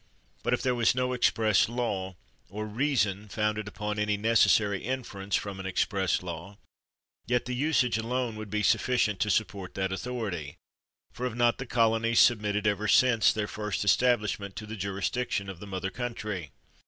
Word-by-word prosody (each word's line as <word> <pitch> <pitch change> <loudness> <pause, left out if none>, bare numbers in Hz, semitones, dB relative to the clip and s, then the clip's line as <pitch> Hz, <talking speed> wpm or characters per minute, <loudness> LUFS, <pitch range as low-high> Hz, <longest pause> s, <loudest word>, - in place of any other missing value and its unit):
But - - +1
if - - -7
there 125 - +2
was 120 0 +2
no 125 0 0
express 110 -4 +3
law, 100 -6 -2 0.3
or 105 +3 -5
reason 105 -4 0
founded 105 0 -1
upon 105 0 -4
any 105 0 +1
necessary 105 -2 +3
inference 105 -6 -3
from 100 -2 -3
an 95 - -5
express 95 0 0
law, 85 +3 -7 0.7
yet 125 0 +1
the 125 - -3
usage 125 -4 +1
alone 120 0 -2
would 110 -1 -7
be 105 +1 -1
suf - - +3
ficient 110 -6 +1
to 105 - +1
support 100 -2 -1
that 95 -1 -1
authority; 95 -8 -4 0.6
for 125 - -4
have 120 - -6
not 120 -1 +3
the 135 - -5
colonies 115 0 +2
submitted 105 -3 +3
ever 105 +1 +1
since 120 -2 +5
their 105 -1 -2
first 105 -1 -3
establishment 105 -1 +2
to 110 - -6
the 110 +1 -7
jurisdiction 100 +2 -2
of 90 - -12
the 105 - -9
mother 95 -1 -3
country? 105 - -4
105 Hz, 170 wpm, -28 LUFS, 100-120 Hz, 0.7 s, since